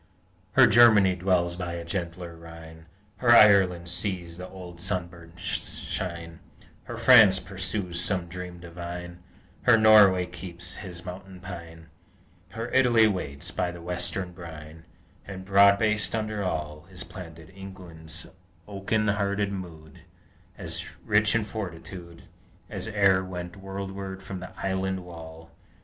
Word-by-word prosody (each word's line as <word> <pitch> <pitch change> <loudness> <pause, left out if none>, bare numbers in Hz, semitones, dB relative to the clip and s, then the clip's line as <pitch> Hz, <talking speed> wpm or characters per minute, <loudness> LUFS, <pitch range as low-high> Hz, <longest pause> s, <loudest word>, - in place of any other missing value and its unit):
Her - - +8
Germany 110 -6 +6
dwells 90 -1 +1
by 90 -1 -4
a 85 -1 -6
gentler 85 -1 -5
Rhine; 80 0 -12 0.3
Her 125 - 0
Ireland 95 -5 +6
sees 90 -1 -3
the 90 0 -7
old 90 -2 -10
sunburst 85 -3 -5 0.2
shine; 85 -2 -5 0.5
Her - - -7
France 110 -7 +7
pursues 95 -2 -3
some 90 -3 -1
dream 90 0 -8
divine; 85 0 -8 0.4
Her 120 -2 +5
Norway 105 -4 +6
keeps 90 0 -7
his 90 -4 -8
mountain 95 +1 -9
pine; 85 -3 -10 0.6
Her 115 +4 -5
Italy 120 -4 +5
waits 75 -9 -3
by 90 - -1
the 85 0 -8
western 90 +1 -2
brine; 80 -2 -11 0.4
And, 95 -1 -8
broad 100 +1 +6
based 105 +1 0
under 110 -1 -2
all, 75 -2 -4
Is 90 -1 -8
planted 85 -3 -11
England's 90 -4 -8 0.4
oaken 105 +2 -1
hearted 100 -1 0
mood, 80 -6 -8 0.6
As - - -2 0.2
rich 105 +1 +3
in 115 - +2
fortitude 90 -4 -8 0.5
As - - -4
e'er 100 -3 +3
went 90 -1 -7
worldward 95 0 -6
from 95 -2 -6
the 90 0 -8
island 95 -1 -2
wall! 80 -1 -11
90 Hz, 130 wpm, -26 LUFS, 85-100 Hz, 0.6 s, Her